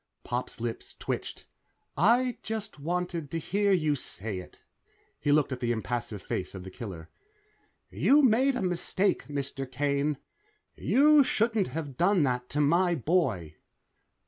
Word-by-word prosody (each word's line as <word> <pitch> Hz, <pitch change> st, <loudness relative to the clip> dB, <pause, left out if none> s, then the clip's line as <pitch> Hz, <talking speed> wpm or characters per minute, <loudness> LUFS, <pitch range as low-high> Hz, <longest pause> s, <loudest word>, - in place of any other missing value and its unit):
Pop's 125 Hz, -1 st, -4 dB
lips 115 Hz, 0 st, -5 dB
twitched. -, -, -5 dB, 0.5 s
"I 240 Hz, -, +3 dB
just 215 Hz, -5 st, -5 dB
wanted 170 Hz, 0 st, -2 dB
to 165 Hz, -, -3 dB
hear 200 Hz, +5 st, +1 dB
you 155 Hz, -6 st, +2 dB
say 110 Hz, -6 st, -4 dB
it." 90 Hz, -, -13 dB, 0.6 s
He 145 Hz, -, +1 dB
looked 145 Hz, -1 st, +3 dB
at 130 Hz, -, -3 dB
the 120 Hz, -2 st, 0 dB
impassive 115 Hz, -3 st, -3 dB
face -, -, -4 dB
of 95 Hz, -, -7 dB
the 95 Hz, -, -9 dB
killer. 90 Hz, -8 st, -8 dB, 0.8 s
"You 290 Hz, +2 st, +4 dB
made 260 Hz, +3 st, +4 dB
a 250 Hz, -, -2 dB
mistake, 185 Hz, +2 st, 0 dB
Mr. 140 Hz, -2 st, -4 dB
Kane. 140 Hz, +2 st, 0 dB, 0.6 s
You 295 Hz, +2 st, +5 dB
shouldn't 225 Hz, -5 st, +1 dB
have 145 Hz, -5 st, -5 dB
done 180 Hz, -1 st, +3 dB
that 125 Hz, -2 st, -1 dB
to 150 Hz, -, 0 dB
my 170 Hz, +4 st, +3 dB
boy." 120 Hz, -, 0 dB
150 Hz, 145 wpm, -28 LUFS, 125-200 Hz, 0.8 s, You